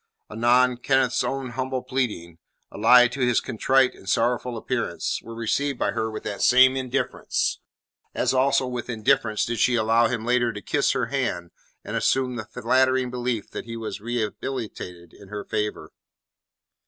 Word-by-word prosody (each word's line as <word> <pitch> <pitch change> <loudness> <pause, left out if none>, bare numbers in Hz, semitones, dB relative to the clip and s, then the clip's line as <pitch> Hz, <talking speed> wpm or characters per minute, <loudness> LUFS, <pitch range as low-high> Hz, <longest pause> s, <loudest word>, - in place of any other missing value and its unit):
Anon 120 +3 +3
Kenneth's 130 0 +1
own 135 -1 -3
humble 130 +1 -3
pleading, 110 -11 -3 0.3
allied 120 +3 +5
to 140 - -6
his 125 -2 +3
contrite 130 +3 +2
and 95 - -11
sorrowful 120 +2 0
appearance, - - -2
were 115 - -10
received 120 +5 -1
by - - 0
her 110 -1 -2
with 110 -1 -7
that 100 - -5
same 130 +1 +6
indifference, 130 0 -1 0.6
as - - +1
also 135 +1 +2
with 125 -1 -5
indifference 110 -1 +1
did 120 -1 -3
she 125 +3 +3
allow 115 +1 +3
him 115 -2 -3
later 120 -1 +2
to 105 - -6
kiss - - +1
her - - 0
hand 85 -1 -2 0.3
and - - -5
assume 130 -2 +1
the 110 -3 -5
flattering 130 +2 +1
belief 125 -3 -3
that - - -6
he 115 0 -6
was 110 -2 -6
rehabilitated 110 -6 -5
in 100 - -15
her 105 +1 -6
favour. 105 -1 -3
120 Hz, 160 wpm, -24 LUFS, 110-130 Hz, 0.6 s, same